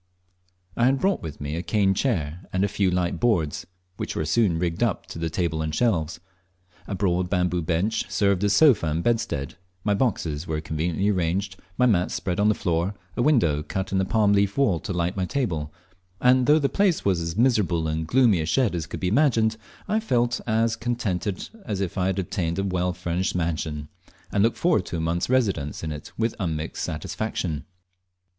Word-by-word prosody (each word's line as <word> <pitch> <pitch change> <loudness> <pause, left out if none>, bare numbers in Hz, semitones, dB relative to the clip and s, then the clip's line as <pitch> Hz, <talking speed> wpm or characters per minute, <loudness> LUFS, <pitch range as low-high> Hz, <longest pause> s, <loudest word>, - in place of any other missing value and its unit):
I 120 - +2
had 135 +2 +4
brought 195 +4 +1
with 80 -3 -7
me 75 +1 -4
a 85 - -2
cane 95 +2 +2
chair, 90 - -1
and 95 +1 +1
a - - +3
few 100 -1 +1
light 90 -1 0
boards, 90 -12 0 0.3
which - - -4
were 80 - -1
soon 90 +1 +2
rigged 85 +1 -2
up 115 -6 +1
into 80 - -6
a 80 - 0
table 80 -1 -1
and 80 0 -2
shelves. 85 -9 0 0.7
A 100 - -3
broad 90 -2 0
bamboo 90 -2 +1
bench 90 +7 -1
served 100 -2 +1
as 100 - +3
sofa 115 - +5
and 80 +2 -1
bedstead, 80 - -1 0.3
my 105 - +2
boxes 90 - -1
were 80 -1 -1
conveniently 80 +5 -1
arranged, 95 +1 0 0.2
my 125 - +4
mats 95 -7 +2
spread 90 0 -2
on 105 +1 +4
the 105 - +3
floor, 90 +1 -1 0.2
a - - 0
window 115 - +3
cut 95 +5 -4
in 95 - +1
the - - +2
palm 105 0 +3
leaf 100 0 +2
wall 120 -12 +3
to 75 - -6
light 90 0 -1
my 95 -2 -1
table, 85 - -2 0.5
and 125 0 +4
though 150 +1 +6
the 145 -3 +2
place 195 +1 +1
was 95 -4 +2
as 85 +2 -4
miserable 105 -10 +2
and 80 +1 -2
gloomy 115 -6 +4
a - - -2
shed 105 +6 +2
as 80 -3 -3
could - - -6
be 90 - -1
imagined, 115 -2 +3 0.3
I 215 +2 +1
felt 120 - 0
as 115 0 +2
contented 110 -5 -2 0.2
as 105 -4 -3
if 95 -4 -2
I 90 0 +1
had 95 0 0
obtained 85 -2 -2
a 95 - 0
well 90 -2 0
furnished 90 +1 -2
mansion, 80 -3 -2 0.4
and 100 - +2
looked 115 +2 +2
forward 160 - +2
to 85 - -3
a - - -2
month's 85 +4 -1
residence 100 - 0
in 80 - -3
it 75 -1 -8
with 115 0 0
unmixed 80 -5 -3
satisfaction. 80 0 -3
95 Hz, 200 wpm, -25 LUFS, 85-110 Hz, 0.7 s, though